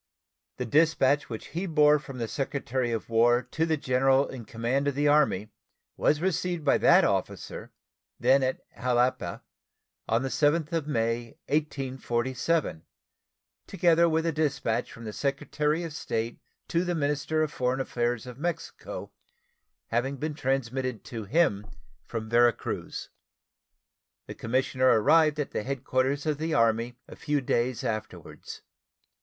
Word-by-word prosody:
The 125 - -2
dispatch 145 0 +3
which 110 -2 -7
he 175 +5 -3
bore 150 -2 +5
from 135 -2 -9
the 115 -2 -2
Secretary 130 -2 -2
of 115 -2 -3
War 120 +2 +3
to 160 +1 0
the 160 -1 +1
general 135 0 +2
in 125 -4 -8
command 120 +6 -1
of 140 - 0
the 145 +1 +2
Army 140 -9 +3 0.5
was 150 +1 +2
received 180 -2 -1
by - - +4
that - - +6
officer, - - -2 0.5
then 135 +1 +4
at 130 0 -1
Jalapa, 120 -7 0 0.7
on 115 +3 +2
the 135 - -2
7th 155 +3 +1
of 160 -3 -1
May, 115 0 -1
1847, 135 - -1 0.9
together 170 -2 +3
with 160 0 +1
the 165 - +1
dispatch 140 -7 -1
from 115 - -11
the 110 -2 -6
Secretary 150 - -1
of 165 -3 -5
State 115 -5 -3 0.3
to 170 +1 +1
the 175 -1 -1
minister 150 +1 0
of 150 - -3
foreign 125 +1 0
affairs 120 -2 -1
of 125 0 -10
Mexico, 170 +1 -5 0.8
having 130 +4 -1
been 150 +3 -3
transmitted 130 -4 -2
to 115 -3 -6
him 105 -5 +1 0.4
from 110 -1 -4
Vera 120 +1 +5
Cruz. - - -6 1.1
The - - -7
commissioner 130 +2 0
arrived 155 +4 +4
at 150 - -2
the - - -2
headquarters 135 +3 -1
of 150 -2 -1
the 160 0 -1
Army 115 -1 +2
a - - -11
few 145 0 -1
days 125 -2 0
afterwards. 110 -1 -6
135 Hz, 145 wpm, -27 LUFS, 120-150 Hz, 1.1 s, that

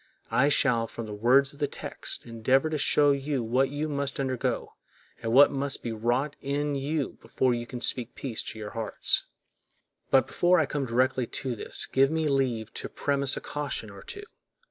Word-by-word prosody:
I 140 +3 +4
shall, 125 -5 +3
from 115 - -7
the 105 - -7
words 130 +6 +3
of 140 - -16
the 145 - +1
text, - - -6
endeavor 130 +6 +1
to 155 - 0
show 145 +1 +4
you 140 -2 -1
what 130 +4 +2
you 145 +2 -2
must 140 -2 -3
undergo 130 -2 -2 0.5
and 115 - -2
what 140 +4 +7
must 140 0 0
be 120 - -3
wrought 120 +6 0
in 145 +1 -1
you 140 +1 -2
before 130 -1 +1
you 120 0 -3
can 120 -1 -7
speak 125 -2 0
peace 125 -5 -3
to - - -7
your 105 -1 -6
hearts. 115 -2 0 0.8
But 135 - +5
before 180 0 +3
I 160 - +3
come 140 -1 -2
directly 125 +1 +1
to 130 0 -3
this - - -2
give 135 +1 +3
me 160 0 0
leave 125 -5 0
to - - -6
premise 140 -1 0
a - - -4
caution 145 -7 -4
or 100 - -11
two. 405 - -8
135 Hz, 190 wpm, -27 LUFS, 120-145 Hz, 0.8 s, what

